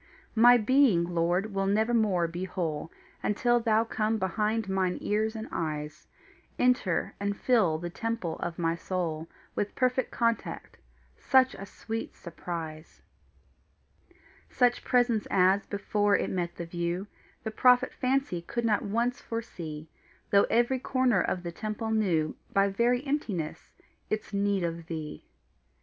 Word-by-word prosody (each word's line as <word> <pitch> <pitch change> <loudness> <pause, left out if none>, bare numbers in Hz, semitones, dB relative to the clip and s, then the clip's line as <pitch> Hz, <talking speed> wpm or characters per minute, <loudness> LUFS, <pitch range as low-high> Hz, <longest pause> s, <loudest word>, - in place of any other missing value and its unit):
My 240 +2 +7
being, 240 -5 +4
Lord, 175 +4 0
will 195 0 0
nevermore 215 -4 +2
be 175 +3 -4
whole 160 -4 -3 0.3
Until 240 +3 +2
thou 225 -1 +3
come 220 -1 -1
behind 215 +2 -1
mine 190 -2 0
ears 215 +2 0
and 220 0 -5
eyes, 150 -2 -4 0.5
Enter 250 -8 +1
and 200 0 -2
fill 210 -11 +3
the 175 +1 -5
temple 225 -6 -3
of 170 -1 -4
my 165 -1 +1
soul 165 -3 -3 0.2
With 205 - -2
perfect 255 0 +1
contact 230 -1 -2 0.4
such 260 -1 +4
a 195 - -8
sweet 225 +3 -6
surprise 165 -2 -7 1.5
Such 245 -1 +2
presence 245 -4 +2
as, 190 +1 +3
before 205 0 +1
it - - -2
met 175 -2 -2
the 170 - -5
view, 175 +2 -3 0.4
The 220 - -3
prophet 250 +2 +4
fancy 260 -9 0
could 235 +7 -3
not 215 -2 +2
once 235 +4 -1
foresee, 165 -9 -6 0.4
Though 200 0 +5
every 240 +3 +2
corner 255 -6 +2
of 180 - -2
the 170 - -4
temple 215 +4 -4
knew 175 -8 +1 0.2
By 200 0 +3
very 240 +6 +1
emptiness 210 - -3 0.3
its 215 0 -3
need 200 -1 +1
of 165 -1 -4
thee. 155 -2 -6
200 Hz, 135 wpm, -28 LUFS, 175-230 Hz, 1.5 s, My